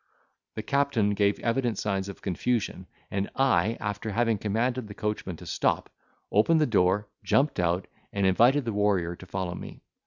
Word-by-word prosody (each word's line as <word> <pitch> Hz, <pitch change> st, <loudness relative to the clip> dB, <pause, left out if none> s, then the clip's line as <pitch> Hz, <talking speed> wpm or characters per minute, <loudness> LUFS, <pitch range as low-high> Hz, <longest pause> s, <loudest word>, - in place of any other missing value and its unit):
The 110 Hz, -, -4 dB
captain 140 Hz, -5 st, +1 dB
gave 100 Hz, 0 st, +2 dB
evident 120 Hz, -2 st, 0 dB
signs 100 Hz, -1 st, -1 dB
of 100 Hz, -, -10 dB
confusion: 95 Hz, -1 st, -1 dB, 0.2 s
and 100 Hz, 0 st, -1 dB
I, 115 Hz, -5 st, +2 dB
after 105 Hz, +1 st, -3 dB
having 115 Hz, 0 st, +1 dB
commanded 115 Hz, +4 st, -1 dB
the 105 Hz, -, -9 dB
coachman 105 Hz, -4 st, -3 dB
to -, -, -11 dB
stop, -, -, 0 dB, 0.4 s
opened 155 Hz, +11 st, +4 dB
the 155 Hz, -, +4 dB
door, 105 Hz, -2 st, +2 dB, 0.2 s
jumped 145 Hz, -5 st, +2 dB
out, 90 Hz, +1 st, +1 dB, 0.3 s
and 100 Hz, -1 st, 0 dB
invited 120 Hz, +9 st, +4 dB
the 115 Hz, -, -2 dB
warrior 100 Hz, -4 st, +1 dB
to 95 Hz, -, -13 dB
follow 95 Hz, -2 st, -3 dB
me. -, -, -9 dB
105 Hz, 165 wpm, -27 LUFS, 95-120 Hz, 0.4 s, opened